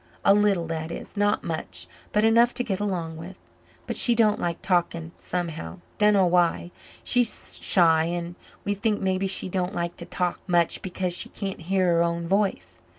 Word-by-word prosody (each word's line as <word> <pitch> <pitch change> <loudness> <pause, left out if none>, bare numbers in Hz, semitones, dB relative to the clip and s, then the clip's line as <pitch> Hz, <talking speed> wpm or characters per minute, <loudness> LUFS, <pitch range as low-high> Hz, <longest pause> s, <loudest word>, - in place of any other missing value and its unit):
"A 195 - +7
little, 200 -4 +2
that 160 0 -4
is - - -8
not 205 0 +1
much, 160 -2 -3 0.3
but 210 - +2
enough 230 +2 +4
to 245 - 0
get 200 -5 -2
along 175 -6 -3
with. 180 +4 -9 0.5
But - - -4
she 240 - +3
don't 215 -2 +3
like 170 -1 -2
talking 170 -3 0
somehow 170 -1 -4 0.2
dunno 210 -2 +5
why. 175 0 +1 0.3
She's 245 -2 0
shy 165 -3 +4
and 170 0 -3 0.3
we 205 - +1
think 205 +1 0
maybe 190 0 0
she 190 - +1
don't 185 +1 -2
like 170 0 -3
to - - -7
talk 180 -1 -2
much 175 -2 +2
because 180 -1 -2
she - - 0
can't 195 -4 -5
hear 190 +3 +1
her 170 -1 +3
own 170 0 -1
voice. 195 +1 -1
180 Hz, 180 wpm, -25 LUFS, 170-205 Hz, 0.5 s, A